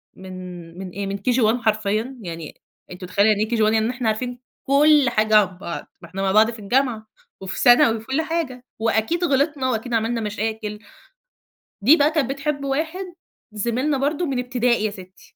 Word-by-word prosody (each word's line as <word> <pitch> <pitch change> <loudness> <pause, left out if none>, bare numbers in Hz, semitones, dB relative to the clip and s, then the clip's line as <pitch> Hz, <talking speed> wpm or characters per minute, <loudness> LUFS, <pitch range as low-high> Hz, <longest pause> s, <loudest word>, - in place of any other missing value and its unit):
من 180 -2 -10
من 190 0 -6
إيه، 195 +2 -5
من 200 - -4
KG 250 +4 +1
1 220 +2 +3
حرفيًا، 220 +3 -1
يعني 165 -5 -8 0.3
أنتِ 180 +1 -9
مُتخيلة 200 +4 +2
يعني 210 0 +2
إيه - - -12
KG 235 - +1
1، 215 +1 +3
يعني 220 +1 +2
إحنا 245 -2 -3
عارفين 245 +3 -2 0.3
كُلّ 290 +1 +5
حاجة 215 0 +2
عن 185 -3 +2
بعض، 175 -2 -6
ما - - -11
إحنا 195 - -5
مع 195 -1 +1
بعض 220 +3 +5
في 225 - -10
الجامعة، 230 0 0 0.3
وفي 190 -1 -5
ثانوي، 240 -2 +6
وفي 220 - -11
كُلّ 270 +6 0
حاجة، 315 -7 -3
وأكيد 225 +10 0
غلطنا 280 -3 +1
وأكيد 240 0 -3
عملنا 230 +1 0
مشاكل. 215 0 -3 1.0
دي 280 +10 +6
بقى 290 0 +3
كانت 305 -6 0
بتحب 280 +1 -2
واحد 320 +7 -2 0.5
زميلنا 240 +7 -1
برضه، 290 +5 0
من 270 -5 -2
ابتدائي 245 -2 +1
يا 210 - -1
ستي. 185 -1 -13
225 Hz, 190 wpm, -22 LUFS, 205-270 Hz, 1.0 s, ثانوي